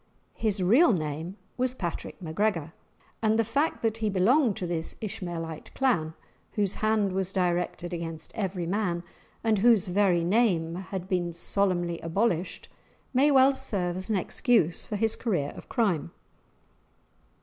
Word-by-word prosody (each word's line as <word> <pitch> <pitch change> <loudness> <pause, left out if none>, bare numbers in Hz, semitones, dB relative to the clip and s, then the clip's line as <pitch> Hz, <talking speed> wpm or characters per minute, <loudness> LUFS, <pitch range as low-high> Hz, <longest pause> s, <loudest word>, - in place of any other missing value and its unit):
His 210 -4 -1
real 235 - +5
name 160 +3 -3 0.2
was 255 0 0
Patrick 175 -8 -5
MacGregor, 165 -2 -1 0.5
and 220 0 +3
the 225 - +3
fact 280 +8 -1
that 225 -1 +1
he 220 -1 0
belonged 215 +5 +3
to 180 - -3
this 170 -2 -2
Ishmaelite 175 -7 -5
clan, 170 -13 +1 0.4
whose 200 -3 +1
hand 215 -2 +1
was 190 0 -1
directed 175 -1 -1
against 165 -2 -5
every 190 -5 -2
man, 175 -2 -1 0.4
and 220 -3 +2
whose 225 -2 +5
very 180 -2 +2
name 175 -4 +2 0.2
had 190 -2 -4
been 175 -3 -1
solemnly 175 -1 0
abolished, 175 +1 -1 0.5
may 270 +3 +4
well 270 -1 +6
serve 190 -10 -1
as 185 +2 -3
an 215 - +2
excuse 185 - +1
for 210 - -4
his 220 +2 +2
career 175 - -1
of - - -12
crime. 195 - +1
190 Hz, 145 wpm, -27 LUFS, 170-220 Hz, 0.5 s, well